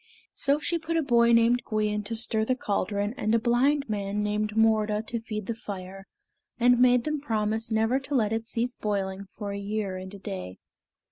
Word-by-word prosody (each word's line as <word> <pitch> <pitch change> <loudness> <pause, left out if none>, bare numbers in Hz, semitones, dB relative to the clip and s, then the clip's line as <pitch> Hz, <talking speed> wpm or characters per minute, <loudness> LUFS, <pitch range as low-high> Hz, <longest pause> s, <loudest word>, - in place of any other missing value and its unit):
So 280 +1 +1
she 335 +2 -2
put 330 +1 -2
a 325 - +2
boy 235 -3 +4
named 235 +1 +4
Gwion 210 -1 -1
to 225 +3 -3
stir 220 -1 +3
the 255 +3 +1
caldron 205 -2 -1
and 215 +2 +1
a - - +4
blind 265 +5 +2
man 205 -1 -2
named 210 0 -1
Morda 215 -1 +2
to 235 +1 -3
feed 215 -2 -5
the 230 - -2
fire; 195 -3 -8 0.5
and 245 0 +5
made 250 -1 +5
them 305 0 -2
promise 220 -3 -1
never 225 +3 +2
to 275 +1 -4
let 220 -4 +2
it 225 0 -3
cease 240 +1 -2
boiling 200 -2 -2
for 205 +1 -7
a 200 - -4
year 200 -2 -3
and 185 0 -8
a - - -8
day. 95 - -6
220 Hz, 200 wpm, -27 LUFS, 205-240 Hz, 0.5 s, and